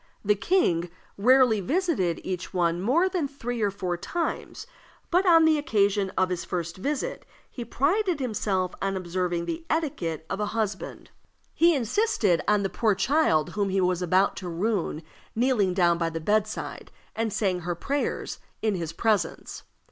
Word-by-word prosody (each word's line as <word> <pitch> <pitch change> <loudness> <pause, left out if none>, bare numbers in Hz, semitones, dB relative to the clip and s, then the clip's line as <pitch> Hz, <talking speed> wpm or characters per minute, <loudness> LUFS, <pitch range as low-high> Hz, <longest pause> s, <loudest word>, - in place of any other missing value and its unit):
The 210 - +5
king 190 - +1 0.3
rarely 250 0 +5
visited 270 - 0
each 185 0 -5
one 175 -1 +1
more 290 - +3
than 360 -6 -1
three 245 -4 -5
or 205 - +2
four 185 -3 -3
times; 340 - -4 0.5
but, 365 +2 +3
on 330 -2 +7
the 310 -1 +4
occasion 200 -6 +1
of 185 -1 +2
his 180 -1 -2
first 170 -1 -4
visit, 280 +8 -3 0.3
he 245 - -6
prided 330 - 0
himself 200 -7 -1
on 195 0 -1
observing 175 -1 -2
the 330 - -4
etiquette 180 - -2
of 195 - -4
a 210 - 0
husband. 210 -3 -3 0.4
He 335 0 +4
insisted 235 - +1
on 210 -1 +3
the - - +1
poor 215 +2 +1
child 190 - +2
whom 200 -1 -1
he 195 +1 +1
was 180 -1 +1
about 185 +3 +2
to 180 - -5
ruin 175 -3 -1 0.3
kneeling 230 -5 +2
down 170 -2 +3
by 165 -1 0
the 165 0 -4
bedside, 210 +5 -2 0.2
and 225 -1 -1
saying 190 -3 0
her 175 0 -3
prayers 280 - -3 0.2
in 215 -2 +2
his 165 -3 -4
presence. 200 -3 -1
200 Hz, 165 wpm, -26 LUFS, 180-265 Hz, 0.5 s, on